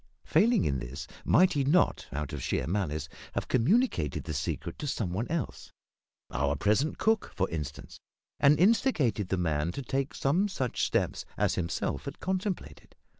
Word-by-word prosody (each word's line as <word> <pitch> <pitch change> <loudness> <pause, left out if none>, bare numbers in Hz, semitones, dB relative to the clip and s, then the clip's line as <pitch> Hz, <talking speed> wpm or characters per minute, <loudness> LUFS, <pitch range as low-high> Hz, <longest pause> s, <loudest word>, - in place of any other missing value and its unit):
Failing 230 -3 +4
in 70 -2 0
this, 60 +3 -6 0.2
might 185 0 +5
he 145 -3 +1
not, 160 +7 +2
out 75 0 -4
of 75 - -4
sheer - - -1
malice, 80 -5 -1 0.3
have - - -2
communicated 130 - +2
the 80 - -4
secret 75 +1 -3
to 150 - -4
some 110 -9 -2
one 110 +6 -2
else 165 0 -4 0.6
our 70 +2 0
present 110 - +1
cook, 220 -1 +1
for 95 -1 +1
instance 75 -4 -6 0.4
and 145 +2 +5
instigated 165 - +3
the 95 - +1
man 80 -2 0
to 140 - -5
take 135 +2 -2
some 170 +9 +2
such 130 - -2
steps - - 0
as - - +2
himself 85 -5 -2
had - - -6
contemplated? 190 0 -4
120 Hz, 165 wpm, -29 LUFS, -, 0.6 s, might